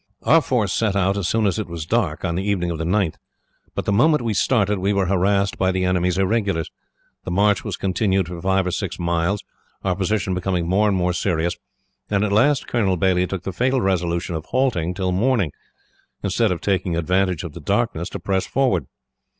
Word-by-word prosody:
"Our 165 +2 +5
force 115 -9 0
set 105 -3 0
out 95 0 +2
as 100 -4 -1
soon 110 +2 +1
as 100 +2 +1
it 105 - -3
was 85 -2 -6
dark, - - 0
on 85 - -1
the 90 +3 -2
evening 95 -4 0
of 80 - -4
the - - -1
9th; 95 -2 0 0.6
but - - -3
the - - 0
moment 140 +7 +3
we 115 -2 0
started, 105 -2 +2
we 100 +2 +1
were 100 -1 +1
harassed 100 +2 +1
by 95 -1 +2
the 95 0 0
enemy's 90 -1 +1
irregulars. 95 -4 0 0.5
The - - -6
march 100 -1 +2
was - - -4
continued 95 -1 0
for 85 -1 -7
five 95 0 +1
or 90 - -1
six 95 0 -3
miles, 85 +3 0 0.4
our 95 -2 0
position 100 0 -1
becoming 90 -2 -1
more 100 +4 +3
and 100 -2 +1
more 90 0 +1
serious, 85 -1 0 0.5
and 100 0 +1
at 105 - 0
last 135 +7 +3
Colonel 100 -6 +1
Baillie 90 -1 +2
took 95 -2 -5
the 95 - -4
fatal 130 +7 +1
resolution 90 -3 -1
of 80 -1 -4
halting 95 -10 0
till 95 -1 -1
morning, 100 - +1 0.7
instead 100 +2 +1
of 85 - -2
taking 90 -3 0
advantage 90 +1 0
of 85 -4 -7
the 85 - -9
darkness 100 -1 -1
to - - -6
press 95 -1 -1
forward. 100 - +1
95 Hz, 205 wpm, -22 LUFS, 90-105 Hz, 0.7 s, Our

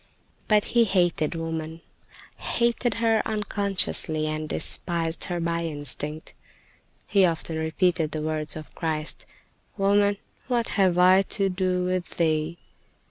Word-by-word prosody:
But 210 -1 +3
he 235 -1 +5
hated 175 -6 +1
woman—hated 165 +8 -3
her 225 -1 +2
unconsciously, 200 -6 -1
and 155 0 -3
despised 170 -2 -1
her 175 -1 -3
by 170 0 -1
instinct. 150 0 -2 0.7
He 200 -2 +3
often 165 -2 0
repeated 160 0 +1
the 155 0 -4
words 155 -1 -2
of 155 -1 -9
Christ: 155 -2 -3 0.5
"Woman, 200 0 +3 0.3
what 240 -2 0
have 185 -3 +3
I 185 +1 +6 0.2
to 195 -1 +2
do 185 -1 0
with 185 -1 -3
thee?" 160 0 0
175 Hz, 120 wpm, -25 LUFS, 160-195 Hz, 0.7 s, I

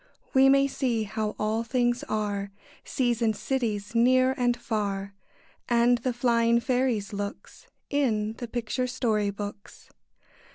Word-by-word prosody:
We 270 0 +6
may 275 0 +5
see 250 -5 -1
how 215 +1 -3
all 215 +2 0
things 240 0 0
are, 205 -2 -2 0.3
Seas 240 -3 -1
and 220 -2 +2
cities, 220 -6 -2
near 255 +2 +4
and 245 -1 +1
far, 200 -4 -3 0.6
And 240 0 +4
the 255 +2 -1
flying 235 -1 +2
fairies' 240 -4 0
looks, 200 0 -7 0.2
In 220 -7 +1
the 240 - -5
picture 240 +2 -2
story 225 -5 0
books. 205 0 -8
235 Hz, 130 wpm, -27 LUFS, 210-250 Hz, 0.6 s, We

